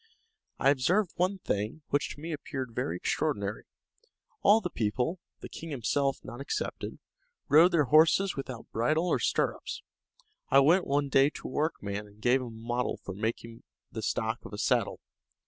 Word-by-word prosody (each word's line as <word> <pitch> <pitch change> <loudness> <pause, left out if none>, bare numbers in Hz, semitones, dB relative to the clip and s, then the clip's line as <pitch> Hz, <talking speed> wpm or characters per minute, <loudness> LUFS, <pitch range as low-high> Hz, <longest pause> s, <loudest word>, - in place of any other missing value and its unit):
I 135 - +4
observed 175 +8 +2
one 185 +3 +1
thing, 110 - -3
which 145 +1 +1
to - - -14
me 165 +3 -5
appeared 135 -5 -5
very 85 - -2
extraordinary. 105 -6 -2 0.8
All 210 +2 +6
the 180 -5 -4
people, 125 - -1 0.2
the - - -7
king 165 - -8
himself 135 0 0
not 120 - -8
excepted, 140 - -4 0.5
rode 165 +5 +7
their 165 -3 +4
horses 160 +7 +4
without 130 -4 -6
bridle 155 +10 +1
or 150 - +2
stirrups. - - -1 0.7
I 135 - +5
went 165 +7 +4
one 140 0 +1
day 135 +1 +5
to - - -8
a - - -7
workman, 105 -9 -2
and 105 +1 -20
gave 125 +4 +3
him 125 - -5
a - - -7
model 120 +2 -2
for 95 - -5
making 115 +3 -4 0.3
the - - -5
stock - - -1
of - - -10
a - - -5
saddle. - - 0
140 Hz, 170 wpm, -29 LUFS, 115-160 Hz, 0.8 s, rode